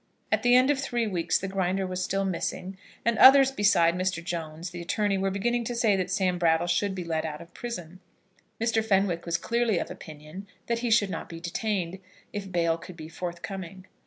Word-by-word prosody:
At - - +2
the 245 0 +5
end 255 +3 +5
of 280 - 0
three 240 -4 -1
weeks 180 -6 0
the 195 - -4
Grinder 190 0 -1
was 185 0 -3
still 195 0 -1
missing; 185 +1 -3 0.3
and 235 -1 +1
others 270 0 +8
besides 185 -8 +3
Mr. 185 -2 -1
Jones, 170 0 -5
the 175 -1 -7
attorney, 205 +4 0
were 195 0 0
beginning 235 +5 0
to 240 - -3
say 225 -4 +3
that 185 -1 -1
Sam 185 -2 0
Brattle 165 0 +3
should 190 +3 0
be 180 - -4
let 160 -2 -2
out 150 -1 -5
of 170 - -13
prison. 185 -7 -7 0.6
Mr. 225 -1 +1
Fenwick 195 -5 +1
was 170 0 +1
clearly 235 +1 0
of - - -3
opinion 155 +5 -10 0.2
that 235 0 -1
he 240 0 -1
should 210 -4 +3
not - - -5
be 165 - -8
detained, 185 +1 -2 0.3
if 200 -2 -5
bail 170 -2 +1
could 170 0 -11
be 155 -1 -8
forthcoming. 185 +2 -6
190 Hz, 205 wpm, -27 LUFS, 170-215 Hz, 0.6 s, others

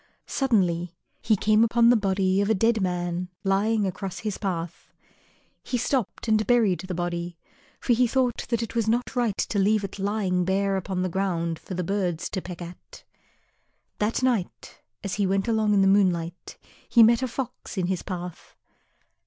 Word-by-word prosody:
Suddenly 180 - 0 0.3
he 220 -1 +3
came 215 +2 +3
upon 235 +1 +4
the - - +5
body 195 -2 +1
of 200 - 0
a 220 - +3
dead 225 +2 +2
man 180 -1 -2
lying 205 +2 +2
across 190 0 -4
his 215 -3 -3
path. 175 -4 -4 0.7
He 250 - -2
stopped 245 -2 -2
and 215 -2 +2
buried 225 -7 +3
the 185 -1 -5
body, 175 0 -3 0.4
for 245 - +2
he 245 +1 +3
thought 250 -1 0
that 235 -1 0
it 230 - -6
was 230 -2 0
not 240 +3 0
right 235 -5 0
to 205 - -1
leave 210 +1 +3
it 195 0 -6
lying 195 -2 0
bare 195 +2 +1
upon 190 -1 -2
the - - 0
ground 170 -3 -1
for 185 - -7
the 180 - -2
birds 175 -3 -2
to 190 - -2
peck 175 -1 -7
at. 175 +1 -12 1.0
That 215 +4 0
night 235 -8 -2 0.2
as 200 - -3
he 195 - +2
went 195 +2 0
along 220 -2 +2
in 195 - +4
the - - +4
moonlight 180 -3 +1 0.3
he 235 - +7
met 235 +2 +5
a 260 - 0
Fox 250 -3 -6
in 185 - +1
his 185 0 -1
path. 180 -2 -7
195 Hz, 180 wpm, -25 LUFS, 180-225 Hz, 1.0 s, he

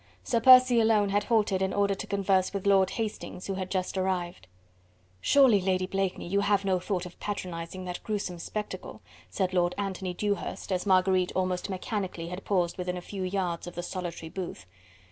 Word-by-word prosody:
Sir 235 - +1
Percy 255 -1 +8
alone 220 -2 +3
had 205 +1 +1
halted 210 -5 +2
in 190 0 0
order 200 -1 +2
to 195 - -6
converse 195 -1 +1
with 195 - -3
Lord 195 -2 +4
Hastings, 215 -4 -5
who 195 - -2
had 185 -1 -4
just 185 -1 -2
arrived. 180 - -2 0.7
"Surely, 240 - +5
Lady 185 0 +1
Blakeney, 195 -1 -2
you 200 +3 +1
have 200 -1 +2
no 185 -2 +2
thought 180 0 -2
of 180 - -11
patronising 185 -2 -5
that 180 -1 -5
gruesome 200 -5 -3
spectacle?" 210 +5 -6 0.3
said 185 -2 -1
Lord 175 -1 +2
Anthony 190 -2 -3
Dewhurst, 205 0 -3
as 185 +2 -1
Marguerite 185 -1 +3
almost 185 0 -1
mechanically 185 -3 -4
had 180 +2 -6
paused 180 -3 0
within 180 0 -2
a - - -3
few 195 +2 -7
yards 185 -2 -2
of 175 - -8
the 175 - -4
solitary 175 -3 -5
booth. 180 - -6
190 Hz, 185 wpm, -28 LUFS, 180-200 Hz, 0.7 s, Percy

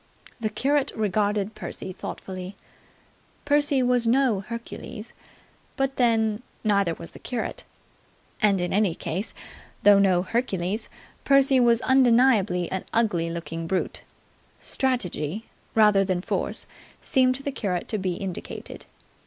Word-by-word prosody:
The 220 -2 -1
curate 275 +6 +1
regarded 210 0 0
Percy 185 - -6
thoughtfully. 185 +1 -7 0.9
Percy 290 -2 +3
was 245 -1 +2
no 245 -3 +3
Hercules: 230 +1 -8 0.6
but 270 -1 -1
then, 225 -3 +2 0.2
neither 200 -6 +2
was 165 - -9
the - - -13
curate. 240 -3 -4 0.8
And 200 -3 +4
in 175 - -1
any 200 -4 +2
case, 185 +7 -4 0.5
though 205 -1 +7
no 185 -3 +3
Hercules, 205 -2 -2 0.3
Percy 275 -1 +5
was 235 -1 +4
undeniably 235 -8 +4
an 190 - -2
ugly 185 -8 +1
looking 165 0 -5
brute. 185 +2 -1 0.6
Strategy, 220 - -1 0.3
rather 210 -3 +5
than 185 -2 -1
force, - - -2 0.4
seemed 255 -1 +3
to 275 - -8
the 280 - -2
curate 190 -9 -2
to 215 - -1
be 185 -2 -1
indicated. 185 -1 -7
215 Hz, 125 wpm, -25 LUFS, 190-250 Hz, 0.9 s, though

